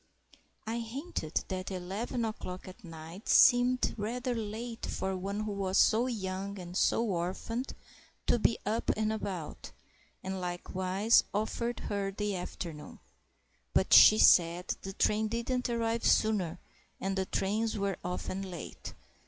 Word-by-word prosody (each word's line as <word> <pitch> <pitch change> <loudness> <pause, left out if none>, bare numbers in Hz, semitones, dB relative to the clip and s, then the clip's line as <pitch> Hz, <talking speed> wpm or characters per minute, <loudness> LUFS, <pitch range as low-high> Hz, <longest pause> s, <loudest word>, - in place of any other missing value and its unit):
I 225 +2 -2
hinted 230 - -3
that 185 0 -3
eleven 195 +6 -3
o'clock 185 -5 -6
at 185 +5 -12
night 165 +3 -9
seemed 250 0 +5
rather 245 +4 -2
late 225 +1 -5
for 190 0 -2
one 200 +3 -3
who 215 -1 -3
was 195 -1 -1
so 230 +3 +4
young 200 -3 -4
and 180 -1 -8
so 230 - +3
orphaned 195 +6 -3 0.5
to 240 - +3
be 230 - +3
up 220 +3 -1
and 215 0 +1
about, 190 -7 -5 0.5
and 190 0 -4
likewise 185 +4 +2
offered 235 +3 -2
her 200 -1 -2
the 205 0 -2
afternoon. 170 -3 -6 0.8
But - - +3
she 215 - +10
said 175 -2 +5
the 195 - -6
train 215 +2 +1
didn't 240 +3 -2
arrive 230 -1 -1
sooner, 195 -6 +2 0.4
and 195 0 -2
the 190 -1 -1
trains 215 +3 -1
were 200 -1 -1
often 180 +2 -3
late. 175 -2 -8
200 Hz, 135 wpm, -31 LUFS, 185-230 Hz, 0.8 s, she